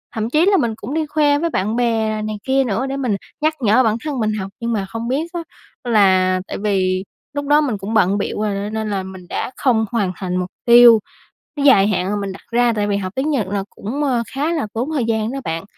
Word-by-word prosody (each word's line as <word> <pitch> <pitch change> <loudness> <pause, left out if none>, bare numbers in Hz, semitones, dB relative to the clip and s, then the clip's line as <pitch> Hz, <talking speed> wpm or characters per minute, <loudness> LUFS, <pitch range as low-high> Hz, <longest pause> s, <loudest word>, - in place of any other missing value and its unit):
Thậm 220 0 -2
chí 310 +6 +3
là 395 0 +4
mình 235 -6 0
cũng 220 +5 -7
đi 315 0 0
khoe 290 -1 +2
với 335 +1 0
bạn 215 -4 -1
bè 225 -3 0
này 215 0 -4
kia 270 0 +2
nữa 240 +1 -1
để 270 0 -3
mình 250 -7 0 0.3
nhắc 310 +1 +2
nhở 230 +3 +4
bản 220 -1 +1
thân 290 -4 -3
mình 215 -1 0
học, 190 0 -5
nhưng 235 0 -2
mà 200 -3 -1
không 225 +4 -5
biết 280 +6 -1
á 345 - -2 0.5
là 185 -3 +4
tại - - -5
vì 190 -2 0 0.3
lúc 285 0 -3
đó 295 +1 +5
mình 255 -8 -1
cũng 200 +3 -5
bận 200 -2 +3
bịu 210 - -3
rồi, 210 -2 0
nên 205 +2 -4
nên 220 -1 -2
là 195 -2 -2
mình 185 -1 -10
đã - - -3
không 230 -5 +2
hoàn 205 -6 0
thành 180 -2 -4
mục 180 0 -2 0.2
tiêu 235 -1 +8 0.6
dài 205 -8 +6
hạn 190 -2 0
mà 210 - -1
mình 195 -1 -3
đặt 190 - -11
ra, 240 0 +3
tại 205 -1 -1
vì 200 - 0
học 185 -2 -4
tiếng 270 +4 -1
Nhật 255 -10 0
là 200 0 -2
cũng, 265 +9 -4
ơ, 250 -5 +1
khá 300 +5 0
là 300 -10 -2
tốn 240 +6 -2
thời 265 -6 0
gian 225 0 -1
đó 275 - -4
bạn. 165 -2 -3
220 Hz, 255 wpm, -19 LUFS, 200-265 Hz, 0.6 s, tiêu